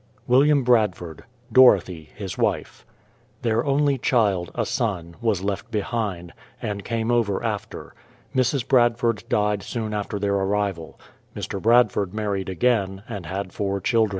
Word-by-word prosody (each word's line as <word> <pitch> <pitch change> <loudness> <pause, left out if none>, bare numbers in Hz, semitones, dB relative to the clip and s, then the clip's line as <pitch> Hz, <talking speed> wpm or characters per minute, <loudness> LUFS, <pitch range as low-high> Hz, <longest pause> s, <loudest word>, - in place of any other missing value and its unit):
WILLIAM 140 +3 +4
BRADFORD; 105 -10 +1 0.3
Dorothy, 95 -10 +4
his 100 -4 -6
wife. - - -2 0.6
Their 115 0 +1
only 140 -1 +1
child, 100 -9 +1
a - - 0
son, 85 -6 -2
was 105 -5 0
left 100 +3 -3
behind, 105 -5 -3 0.3
and 100 -1 -4
came 115 0 -1
over 110 -5 +1
after. - - -5 0.4
Mrs. 130 -1 +1
Bradford 120 -3 +2
died 105 -1 +1
soon 110 +1 -4
after 105 0 -3
their 100 0 0
arrival. 95 -4 -2 0.4
Mr. 100 - -5
Bradford 115 -4 +3
married 100 -3 -2
again, 95 -1 0
and 100 -9 -6
had 95 +2 -5
four 100 -1 -2
children. 110 +2 +2
105 Hz, 135 wpm, -23 LUFS, 95-120 Hz, 0.6 s, WILLIAM